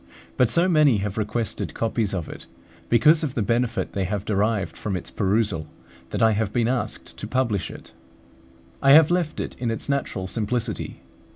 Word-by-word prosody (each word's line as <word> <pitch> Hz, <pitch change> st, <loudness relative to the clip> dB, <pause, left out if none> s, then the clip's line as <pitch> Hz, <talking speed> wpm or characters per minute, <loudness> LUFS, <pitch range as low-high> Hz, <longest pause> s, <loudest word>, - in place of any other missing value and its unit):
But 125 Hz, -3 st, +3 dB
so 170 Hz, +9 st, +3 dB
many 150 Hz, -, +4 dB
have 100 Hz, 0 st, -3 dB
requested 110 Hz, +1 st, -3 dB
copies 115 Hz, -2 st, -1 dB
of 90 Hz, -5 st, -3 dB
it, -, -, -9 dB, 0.4 s
because 150 Hz, +8 st, +5 dB
of 140 Hz, -4 st, -3 dB
the 115 Hz, -, +1 dB
benefit 115 Hz, +2 st, 0 dB
they 95 Hz, -1 st, -1 dB
have 100 Hz, +2 st, -3 dB
derived 105 Hz, 0 st, 0 dB
from 100 Hz, -3 st, -3 dB
its -, -, -7 dB
perusal, 100 Hz, -5 st, 0 dB, 0.4 s
that -, -, -1 dB
I 110 Hz, -, +6 dB
have 105 Hz, -1 st, 0 dB
been 115 Hz, 0 st, +1 dB
asked 125 Hz, -1 st, -3 dB
to -, -, -6 dB
publish 115 Hz, -7 st, 0 dB
it. -, -, -11 dB, 0.9 s
I 135 Hz, -, +6 dB
have 160 Hz, +2 st, +7 dB
left 175 Hz, -3 st, 0 dB
it -, -, -4 dB
in 120 Hz, -, -1 dB
its 115 Hz, -, -4 dB
natural 140 Hz, -9 st, -2 dB
simplicity. 115 Hz, +2 st, -3 dB
115 Hz, 180 wpm, -24 LUFS, 105-125 Hz, 0.9 s, have